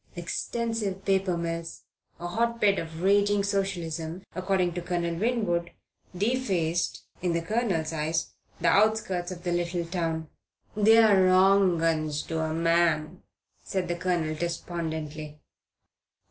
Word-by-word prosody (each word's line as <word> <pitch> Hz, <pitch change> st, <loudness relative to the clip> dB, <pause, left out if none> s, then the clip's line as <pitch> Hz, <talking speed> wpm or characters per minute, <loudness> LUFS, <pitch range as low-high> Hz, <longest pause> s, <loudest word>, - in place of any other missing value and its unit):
Extensive 200 Hz, +2 st, -3 dB
paper 190 Hz, -2 st, +1 dB
mills, 165 Hz, 0 st, -4 dB, 0.4 s
a 175 Hz, -, -6 dB
hotbed 220 Hz, +1 st, +1 dB
of 165 Hz, +1 st, -6 dB
raging 200 Hz, +1 st, +3 dB
Socialism, 180 Hz, -4 st, -2 dB
according 185 Hz, -1 st, 0 dB
to 175 Hz, -, -4 dB
Colonel 170 Hz, -1 st, -1 dB
Winwood, 175 Hz, -4 st, 0 dB, 0.4 s
defaced 190 Hz, -7 st, 0 dB, 0.2 s
(in 175 Hz, -1 st, 0 dB
the 170 Hz, -, 0 dB
Colonel's 195 Hz, -6 st, -1 dB
eyes) 160 Hz, +1 st, -1 dB, 0.3 s
the 170 Hz, -, +1 dB
outskirts 200 Hz, -3 st, +2 dB
of 175 Hz, -1 st, -8 dB
the 175 Hz, -, -1 dB
little 175 Hz, 0 st, -1 dB
town. 165 Hz, -2 st, -2 dB, 0.5 s
"They're 210 Hz, -3 st, +6 dB
wrong 185 Hz, -2 st, +4 dB
'uns 155 Hz, -2 st, 0 dB
to 160 Hz, -, -3 dB
a 160 Hz, 0 st, -1 dB
man," 165 Hz, 0 st, +1 dB, 0.4 s
said 185 Hz, -2 st, -2 dB
the 175 Hz, -, -1 dB
Colonel, 175 Hz, -3 st, -1 dB
despondently. 160 Hz, -2 st, -4 dB
175 Hz, 120 wpm, -27 LUFS, 165-195 Hz, 0.5 s, They're